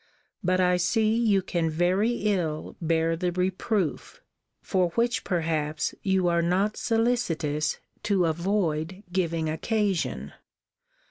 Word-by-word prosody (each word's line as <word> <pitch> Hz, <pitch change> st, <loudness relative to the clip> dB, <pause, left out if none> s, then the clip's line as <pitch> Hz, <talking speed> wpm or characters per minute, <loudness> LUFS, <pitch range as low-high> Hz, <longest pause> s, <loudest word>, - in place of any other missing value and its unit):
But 185 Hz, 0 st, +2 dB
I 180 Hz, -1 st, +3 dB
see 215 Hz, +5 st, +2 dB
you 215 Hz, -5 st, +2 dB
can 170 Hz, -3 st, -1 dB
very 180 Hz, +7 st, +2 dB
ill 175 Hz, -7 st, -1 dB
bear 165 Hz, 0 st, +1 dB
the 175 Hz, +2 st, -1 dB
reproof, 185 Hz, 0 st, -2 dB, 0.4 s
for 185 Hz, -2 st, +1 dB
which 235 Hz, +1 st, +1 dB
perhaps 155 Hz, -4 st, -1 dB
you 190 Hz, -2 st, +1 dB
are 170 Hz, 0 st, +2 dB
not 190 Hz, +5 st, +1 dB
solicitous 180 Hz, -11 st, 0 dB, 0.2 s
to 195 Hz, -4 st, +2 dB
avoid 170 Hz, +1 st, -1 dB
giving 165 Hz, -3 st, 0 dB
occasion. 165 Hz, -, -1 dB
180 Hz, 115 wpm, -26 LUFS, 160-200 Hz, 0.4 s, I